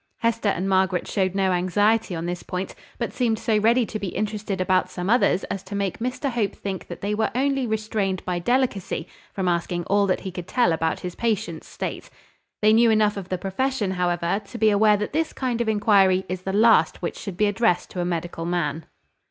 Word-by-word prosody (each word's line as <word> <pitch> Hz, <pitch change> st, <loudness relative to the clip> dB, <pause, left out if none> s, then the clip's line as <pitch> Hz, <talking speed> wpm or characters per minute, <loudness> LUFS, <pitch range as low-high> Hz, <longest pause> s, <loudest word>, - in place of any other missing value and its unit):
Hester 230 Hz, -2 st, 0 dB
and 190 Hz, -1 st, -1 dB
Margaret 190 Hz, -1 st, +1 dB
showed 190 Hz, -2 st, 0 dB
no 190 Hz, -1 st, +2 dB
anxiety 205 Hz, +3 st, +2 dB
on 165 Hz, 0 st, -4 dB
this 175 Hz, 0 st, -3 dB
point, 180 Hz, +1 st, -4 dB, 0.2 s
but 230 Hz, -5 st, -3 dB
seemed 230 Hz, -3 st, +1 dB
so 215 Hz, -1 st, +1 dB
ready 235 Hz, +3 st, +3 dB
to 215 Hz, -, -5 dB
be 200 Hz, -, -3 dB
interested 210 Hz, 0 st, -3 dB
about 185 Hz, 0 st, +2 dB
some 185 Hz, +2 st, -3 dB
others 240 Hz, -5 st, +3 dB
as 195 Hz, -, -4 dB
to 200 Hz, -, -8 dB
make 200 Hz, -2 st, -2 dB
Mr 255 Hz, +4 st, -2 dB
Hope 225 Hz, -4 st, -1 dB
think 195 Hz, -2 st, -5 dB
that -, -, -8 dB
they 205 Hz, +1 st, -1 dB
were 220 Hz, +1 st, +1 dB
only 270 Hz, -1 st, +1 dB
restrained 215 Hz, -4 st, -2 dB
by 180 Hz, -1 st, -1 dB
delicacy 240 Hz, -2 st, 0 dB, 0.3 s
from 190 Hz, -2 st, -2 dB
asking 175 Hz, 0 st, 0 dB
all 200 Hz, +3 st, +2 dB
that 185 Hz, -, 0 dB
he 190 Hz, -, -5 dB
could 180 Hz, -1 st, -7 dB
tell 240 Hz, -10 st, +2 dB
about 160 Hz, 0 st, -1 dB
his 180 Hz, -1 st, -5 dB
patient's 205 Hz, -8 st, -2 dB
state. -, -, -5 dB, 0.5 s
They 215 Hz, +1 st, +6 dB
knew 230 Hz, +1 st, +5 dB
enough 215 Hz, -1 st, +3 dB
of 195 Hz, -2 st, -7 dB
the 185 Hz, -, -1 dB
profession, 205 Hz, +3 st, -1 dB
however, 175 Hz, +1 st, 0 dB
to 220 Hz, +4 st, -9 dB
be 220 Hz, -2 st, +4 dB
aware 210 Hz, 0 st, +4 dB
that 210 Hz, +5 st, -4 dB
this 320 Hz, +1 st, 0 dB
kind 245 Hz, -3 st, -2 dB
of 230 Hz, -, 0 dB
inquiry 200 Hz, -3 st, +3 dB
is 185 Hz, 0 st, -4 dB
the 190 Hz, -, -3 dB
last 210 Hz, -6 st, +4 dB
which 170 Hz, -, -2 dB
should 190 Hz, -3 st, -6 dB
be 210 Hz, -, +3 dB
addressed 205 Hz, -3 st, +1 dB
to 180 Hz, -, -3 dB
a -, -, 0 dB
medical 170 Hz, -1 st, -3 dB
man. 165 Hz, -3 st, -2 dB
200 Hz, 215 wpm, -24 LUFS, 180-220 Hz, 0.5 s, They